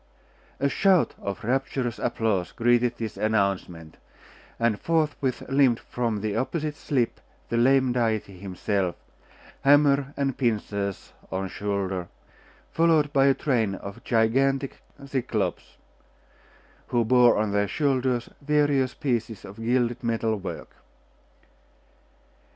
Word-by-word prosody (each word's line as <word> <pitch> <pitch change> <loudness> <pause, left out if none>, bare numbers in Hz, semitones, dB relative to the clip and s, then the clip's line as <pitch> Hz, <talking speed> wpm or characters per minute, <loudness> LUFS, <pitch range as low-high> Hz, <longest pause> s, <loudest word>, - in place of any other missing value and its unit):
A 140 - +2
shout 185 +4 +3
of 100 +3 -5
rapturous 130 0 -1
applause 100 -6 -1
greeted 120 0 +2
this 110 -2 -5
announcement, 100 -6 -1 0.6
and 115 -3 +1
forthwith 150 -5 0
limped 135 -3 +3
from 115 -4 -3
the 105 -1 -2
opposite 150 +5 -2
slip 130 -6 -1 0.3
the 115 - 0
lame 130 +1 +4
deity 110 -6 -1
himself, 95 -1 -2 0.7
hammer 140 -1 +4
and 135 -2 0
pincers 105 -5 -2 0.2
on 95 0 -2
shoulder, 95 -3 -3 0.6
followed 160 -3 +3
by 135 0 +4
a 135 - +4
train 115 -8 0
of 100 +1 -9
gigantic 135 +4 +1 0.2
Cyclops, 120 -8 -3 1.1
who 120 -1 +1
bore 120 +1 +5
on 105 -1 0
their 100 0 +1
shoulders 130 -3 0
various 145 -3 +2
pieces 115 -6 -2
of 100 +2 -11
gilded 120 +2 0
metal 115 -1 0
work. 100 -2 -7
120 Hz, 110 wpm, -25 LUFS, 105-135 Hz, 1.1 s, bore